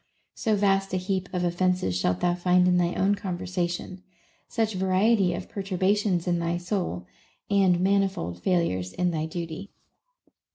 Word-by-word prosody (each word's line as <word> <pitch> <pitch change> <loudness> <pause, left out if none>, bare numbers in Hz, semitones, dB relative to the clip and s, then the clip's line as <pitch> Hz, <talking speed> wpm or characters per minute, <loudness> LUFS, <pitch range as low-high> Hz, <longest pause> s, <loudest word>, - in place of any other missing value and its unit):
So 220 -1 0
vast 195 -1 +2
a - - +2
heap 185 0 -2
of 180 -2 -1
offences 175 - 0
shalt 90 0 0
thou 175 - +2
find 180 0 +3
in 180 0 +4
thy 175 0 +1
own 195 +2 +2
con 190 -3 -3
versation, 175 +1 -3 0.5
such 220 -2 -1
variety 190 0 +2
of - - -6
perturbations 195 -1 0
in 175 -1 +1
thy 170 0 -1
soul, 175 - -3 0.5
and 190 -3 +4
manifold 190 - 0
failures 95 - 0
in 180 -1 0
thy 160 -1 -2
duty. 170 +3 -6
180 Hz, 155 wpm, -26 LUFS, 175-195 Hz, 0.5 s, in